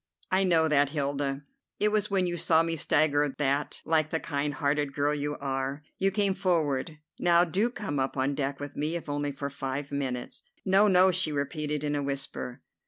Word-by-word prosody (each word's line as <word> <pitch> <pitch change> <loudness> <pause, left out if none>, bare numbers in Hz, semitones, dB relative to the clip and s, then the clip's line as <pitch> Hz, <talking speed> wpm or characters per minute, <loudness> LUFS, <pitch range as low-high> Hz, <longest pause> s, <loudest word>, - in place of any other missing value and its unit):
"I 190 +1 +3
know 165 -4 +4
that, 145 -2 +3
Hilda. 140 -1 -2 0.4
It 210 - +3
was 210 -1 0
when 195 -2 +2
you 175 -1 -1
saw 165 -1 +3
me 165 0 -1
stagger 145 -1 +2
that, 140 0 -1
like 155 -1 +2
the 160 - -1
kind 145 -2 -2
hearted 145 0 0
girl 145 +1 +1
you 145 0 -2
are, 135 +1 -3 0.2
you 195 - +3
came 200 0 +1
forward. 160 -5 0 0.2
Now, 175 0 +5
do 190 +7 +1
come 190 - -4
up 135 +1 -1
on 135 +2 +1
deck 140 0 -2
with 145 0 -7
me, 155 +3 -1
if 170 - -5
only 145 0 -2
for 140 0 -5
five 140 +1 -4
minutes." 130 -3 -3 0.2
"No, 195 +2 +5
no," 185 -1 +5
she 180 -3 +1
repeated 150 +1 -2
in 145 0 -1
a 145 - 0
whisper. 135 -3 -4
145 Hz, 195 wpm, -28 LUFS, 140-170 Hz, 0.4 s, Now